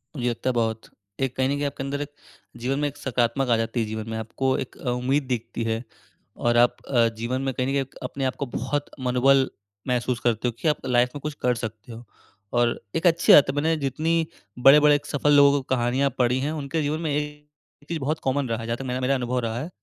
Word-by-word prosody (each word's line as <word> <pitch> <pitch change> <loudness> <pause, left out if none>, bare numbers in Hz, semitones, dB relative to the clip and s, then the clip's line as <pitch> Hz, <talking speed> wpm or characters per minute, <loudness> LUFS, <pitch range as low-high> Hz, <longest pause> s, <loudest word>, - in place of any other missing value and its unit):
मुझे 125 -3 0
लगता 120 +2 -2
है 130 - +1
बहुत। 115 -1 -1 0.3
एक 135 -2 -1
कहीं 130 0 +2
न 140 - +1
कहीं 145 - -1
आपके 140 -1 -4
अंदर 140 +1 -3
एक 145 0 -5 0.5
जीवन 135 +3 0
में 145 - +1
एक 145 - -7
सकारात्मक 125 +1 0
आ 115 - +4
जाती 115 +2 -2
है 115 - +1
जीवन 110 +1 -5
में। 110 - -3
आपको 130 +4 -1
एक - - -22
अ, 125 - -4
उम्मीद 130 +4 +1
दिखती 115 0 -4
है। 115 +1 -2 0.5
और 120 0 +1
आप 120 0 +5
अ, 120 -4 +4
जीवन 120 +3 -2
में 135 -1 -1
कहीं 125 +1 -1
न - - -1
कहीं 140 - +1
एक 135 - -9
अपने 135 - -4
आप 130 - -1
को - - +1
बहुत 145 0 -2 0.2
मनोबल 130 +2 +4 0.4
महसूस 125 -1 0
करते 120 0 0
हो - - 0
कि - - -1
आप 150 -3 0
लाइफ 125 -1 +3
में - - -4
कुछ 150 +1 -4
कर 125 -1 +2
सकते 115 -1 -7
हो। 115 +1 -9 0.5
और 120 -1 +2 0.2
एक 165 +2 +2
अच्छी 170 0 +5
बात 140 -2 +7
मैंने 160 +3 +2
जितनी 155 +4 0 0.5
बड़े-बड़े 145 +1 +7
सफल 145 0 +1
लोगों 140 0 +7
को - - -5
कहानियाँ 125 +3 +1
पढ़ी 125 +1 +2
है, 145 +3 -1
उनके 155 +1 -2
जीवन 150 +2 -1
में 160 -3 -1
एक 150 0 -6
चीज़ 170 -1 -2
बहुत 155 +3 -1
कॉमन 135 0 +1
रहा 115 - 0
है 115 - -6
जहाँ 115 0 -1
तक 135 - -6
मेरा, 125 0 -2
मेरा 130 +2 +2
अनुभव 125 -1 -1
रहा 115 +1 -2
है, 155 - -5
130 Hz, 240 wpm, -24 LUFS, 120-145 Hz, 0.5 s, बात